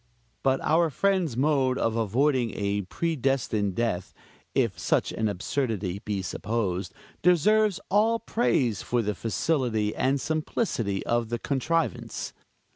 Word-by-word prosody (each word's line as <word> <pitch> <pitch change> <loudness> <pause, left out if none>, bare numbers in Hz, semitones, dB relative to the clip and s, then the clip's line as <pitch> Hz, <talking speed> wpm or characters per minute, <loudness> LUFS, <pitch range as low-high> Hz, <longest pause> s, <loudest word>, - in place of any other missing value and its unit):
But 135 0 +2
our 165 +1 +3
friend's 180 -5 +1
mode 135 -2 +2
of 115 -1 0
avoiding 120 +2 +1
a 100 0 0
predestined 125 - -1
death 95 -6 -2 0.4
if - - +1
such - - +1
an 110 -1 0
absurdity 100 -2 -2
be 100 -3 -2
supposed 95 -2 -2 0.3
deserves 205 +4 +4
all 220 +3 +4
praise 145 - +1
for 120 -1 0
the 105 0 -1
facility 115 -2 0
and 135 +2 +1
simplicity 135 - -1
of 120 -1 0
the 120 - -1
contrivance. 155 +6 -1
125 Hz, 120 wpm, -27 LUFS, 105-155 Hz, 0.4 s, deserves